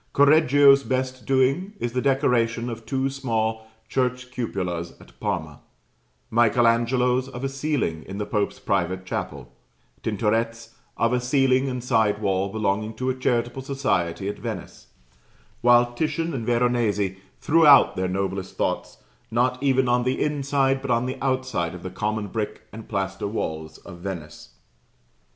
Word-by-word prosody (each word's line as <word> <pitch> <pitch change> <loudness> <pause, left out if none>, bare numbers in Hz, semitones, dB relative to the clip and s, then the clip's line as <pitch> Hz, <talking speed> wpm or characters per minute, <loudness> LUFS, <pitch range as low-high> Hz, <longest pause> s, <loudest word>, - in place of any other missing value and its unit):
Correggio's 145 -1 +6
best 130 -1 -3
doing 135 +9 +2
is 120 -1 -3
the 125 - 0
decoration 125 -3 +1
of 115 -1 -8
two 135 +1 0
small 110 -5 -2 0.2
church 125 -1 -1
cupolas 90 -9 -4
at - - -17
Parma; - - -3 0.7
Michael 120 +1 +3
Angelo's 125 +2 +2
of 125 -1 -8
a - - +1
ceiling 135 - -2
in 95 - -6
the 105 - -2
Pope's 105 -1 -1
private 95 -6 -1
chapel; 70 -7 -5 0.5
Tintoret's, 115 +1 -1 0.2
of 115 +1 +2
a 125 - +2
ceiling 130 +1 +2
and 125 -1 -4
side 110 -4 +2
wall 100 -2 0
belonging 110 +1 -1
to 130 0 -1
a - - -4
charitable 120 0 -1
society 100 -10 -1
at 105 - -4
Venice; - - -7 0.7
while 120 0 +5
Titian 165 +4 -1
and 120 -4 -4
Veronese 115 -5 +1 0.2
threw 165 0 +4
out 140 -1 +7
their 95 0 -1
noblest 95 0 -3
thoughts, - - -2 0.3
not 125 +3 +1
even 130 -2 +2
on 120 0 +3
the 130 +1 -1
inside, 140 -2 +1
but 140 - -6
on 120 0 +2
the 130 +1 -4
outside 130 -11 -1
of 90 - -10
the 95 - -5
common 105 +2 -2
brick 105 +1 -4
and 110 0 -10
plaster 95 -1 -2
walls 80 -6 -4
of 90 -3 -12
Venice. 80 -9 -8
120 Hz, 150 wpm, -24 LUFS, 100-130 Hz, 0.7 s, out